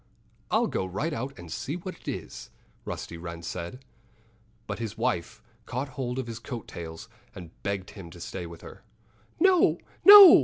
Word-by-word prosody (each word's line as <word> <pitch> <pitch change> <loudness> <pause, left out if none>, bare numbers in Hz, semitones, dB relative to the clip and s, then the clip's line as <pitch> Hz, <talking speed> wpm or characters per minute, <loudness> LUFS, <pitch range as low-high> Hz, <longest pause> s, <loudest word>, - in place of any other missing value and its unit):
"I'll - - +3
go - - -1
right 135 - -2
out 135 +2 -4
and 90 -3 -10
see 125 +6 -3
what 180 +1 -6
it - - -21
is," - - -5 0.4
Rusty 85 - -5
Wren 85 0 -7
said. 90 +10 -6 0.8
But - - -4
his 115 -1 -4
wife 90 -6 -1 0.2
caught 130 +3 -3
hold 130 -1 -3
of 130 - -2
his 115 -1 -6
coat 120 -5 -6
tails 80 -1 -8 0.3
and 85 -3 -9
begged 100 -1 -3
him 95 -5 -10
to 85 - -12
stay 85 +1 -5
with 85 -1 -11
her. - - -11 0.6
"No! 370 0 +5 0.3
no!" 400 -3 +12
115 Hz, 175 wpm, -28 LUFS, 85-135 Hz, 0.8 s, no